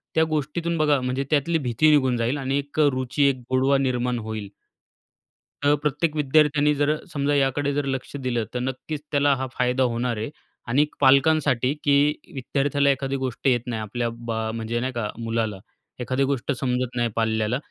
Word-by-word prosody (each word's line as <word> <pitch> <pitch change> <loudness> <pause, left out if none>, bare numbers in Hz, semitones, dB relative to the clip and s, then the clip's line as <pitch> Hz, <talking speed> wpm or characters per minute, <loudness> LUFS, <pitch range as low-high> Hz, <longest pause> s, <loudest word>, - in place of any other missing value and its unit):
त्या 160 - +5
गोष्टीतून 155 +3 -1
बघा 150 -2 +3
म्हणजे 125 +2 -1
त्यातली 155 +2 +2
भीती 135 +1 +2
निघून 130 -4 +3
जाईल 120 +4 0
आणि 135 0 -1
एक 145 +2 -6
अ 150 - +6
रुची, 130 +2 -1
एक 135 - 0
गोडवा 130 +2 +3
निर्माण 125 -2 0
होईल. 110 -2 -5 1.1
तर 145 +1 +4
प्रत्येक 150 +2 0
विद्यार्थ्याने 150 0 +3
जर 145 0 +1
अ, 155 0 -1
समजा 145 0 0
याकडे 140 +1 +1
जर 145 0 -1
लक्ष 135 +1 -4
दिलं. 125 -4 -2
तर 125 - -2
नक्कीच 130 +4 -4
त्याला 145 -1 +3
हा 130 0 -3
फायदा 125 +1 +2
होणार 120 -1 -1
आहे 110 +4 -3 0.4
आणिक 145 +5 +1
पालकांसाठी, 140 -1 +4
की 145 +1 +4 0.2
विद्यार्थ्याला 140 +1 0
एखादी 135 0 0
गोष्ट 130 0 -3
येत 125 -3 +3
नाही 115 -3 -3
आपल्या 115 +3 -2 0.2
बा 115 -1 -2 0.2
म्हणजे 115 +1 -2
नाही 130 +2 -3
का? 115 -3 -2
मुलाला, 115 -3 -2 0.4
एखादी 130 +2 0
गोष्ट 135 0 -1
समजत 125 -2 -1
नाही 120 -1 +1
पाल्याला. 110 +1 0
135 Hz, 175 wpm, -24 LUFS, 120-145 Hz, 1.1 s, अ